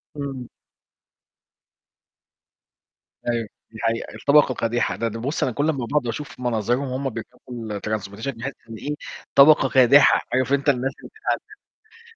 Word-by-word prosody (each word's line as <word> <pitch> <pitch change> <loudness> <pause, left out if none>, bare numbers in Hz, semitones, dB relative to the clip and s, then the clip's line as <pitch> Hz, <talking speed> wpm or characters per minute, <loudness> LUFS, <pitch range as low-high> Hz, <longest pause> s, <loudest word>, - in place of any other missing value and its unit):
امم. 135 -4 -5 2.8
أيوه، 115 -2 -1 0.2
دي 110 - -11
حقيقة، 115 0 -2
الطبقة 145 -2 +4
كادحة، 115 +1 -1
ده 115 - -1
ده 115 0 -5
بص 140 +6 -2
أنا 130 - +1
كل 145 +6 0
اما 135 -6 -1
باقعد 145 0 0
واشوف 135 +5 -6
مناظرهم 120 0 0
وهم 135 +1 -2
بيركبوا 115 -1 -9 0.4
ال 100 - -5
transportation، 110 +3 -3
باحس 135 +4 -4 0.2
إنه 110 - -7
إيه 150 +5 -4 0.4
طبقة 140 -1 +7
كادحة، 135 +2 +6
عارف 130 +2 +1
أنت 140 +1 +2
الناس 135 0 +1
اللي - - -14 0.9
بيتعذبوا. 460 0 -20
130 Hz, 145 wpm, -23 LUFS, 115-140 Hz, 2.8 s, طبقة